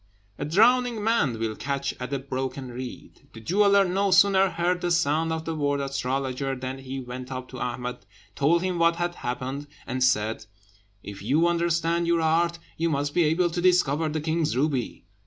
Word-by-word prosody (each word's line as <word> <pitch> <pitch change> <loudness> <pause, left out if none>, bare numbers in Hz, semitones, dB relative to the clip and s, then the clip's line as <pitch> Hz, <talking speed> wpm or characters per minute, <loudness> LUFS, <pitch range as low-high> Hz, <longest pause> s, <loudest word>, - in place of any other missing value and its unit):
A 145 - -2
drowning 230 +6 +3
man 205 - +1
will 110 -1 -2
catch 140 +1 -2
at 125 +1 -5
a 140 - 0
broken 130 0 -4
reed: 130 +2 -9
the 115 - -10
jeweller 200 - +4
no 195 +2 +1
sooner 195 0 +5
heard 180 +1 -1
the 175 - 0
sound 165 -1 +1
of 160 0 -3
the 165 - -2
word 145 -2 0
astrologer, 135 0 -2
than 130 +1 -5
he 135 0 -6
went 125 +1 -7
up 130 -1 -5
to 130 - -8
Ahmed, 125 0 -4 0.3
told 165 - +2
him 185 -2 -1
what 170 0 +4
had 175 +1 -2
happened, 130 +1 -4 0.2
and 130 +1 -1
said, 110 -4 +1 0.6
"If 100 -1 -8
you 160 +5 +2
understand 170 0 +1
your 170 -1 +2
art, 170 +2 +2 0.2
you 165 +1 +1
must 145 -1 -1
be 175 - +3
able 170 +3 +2
to 175 - -2
discover 165 -4 +3
the 155 0 -2
king's 155 -3 0
ruby. 135 - -1
150 Hz, 185 wpm, -26 LUFS, 130-170 Hz, 0.6 s, sooner